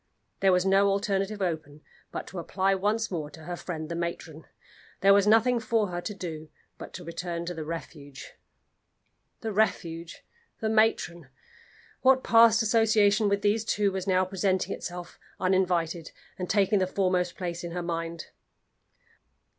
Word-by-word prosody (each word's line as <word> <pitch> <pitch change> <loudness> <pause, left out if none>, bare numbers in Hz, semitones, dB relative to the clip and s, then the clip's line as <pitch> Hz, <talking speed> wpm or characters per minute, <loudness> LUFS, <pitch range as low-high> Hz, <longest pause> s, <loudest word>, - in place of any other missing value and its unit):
There 195 -1 +4
was 180 0 +2
no 195 +1 +4
alternative 195 +1 0
open 155 -4 -4 0.3
but - - -5
to 185 - -7
apply 190 +3 0
once 210 +3 0
more 155 -5 -3
to 160 +1 -13
her 175 +2 -5
friend 160 -3 -6
the 170 - -5
matron. 170 -2 -5 0.6
There 195 +1 +6
was 200 0 +4
nothing 230 +3 +4
for 220 -2 0
her 175 0 -4
to 210 - -5
do 160 -4 -7 0.3
but - - -8
to 180 - -8
return 170 0 -5
to 175 - -4
the 160 -2 -5
Refuge! 150 -3 -8 1.1
The 225 - -3
Refuge! 170 -5 -1 0.3
The 220 - -1
matron! 215 -8 +1 0.7
What 260 0 +4
past 230 0 +6
association 220 -2 +3
with 200 0 0
these 210 +2 +2
two 205 -2 +1
was 190 0 -4
now 185 -1 +3
presenting 190 0 0
itself 175 0 -7 0.2
uninvited, 180 -3 0 0.2
and 180 -1 -5
taking 200 0 +3
the 185 - +1
foremost 185 -2 0
place 175 -2 -4
in 175 - -4
her 175 0 -3
mind? 165 -1 -4
185 Hz, 155 wpm, -27 LUFS, 170-205 Hz, 1.1 s, There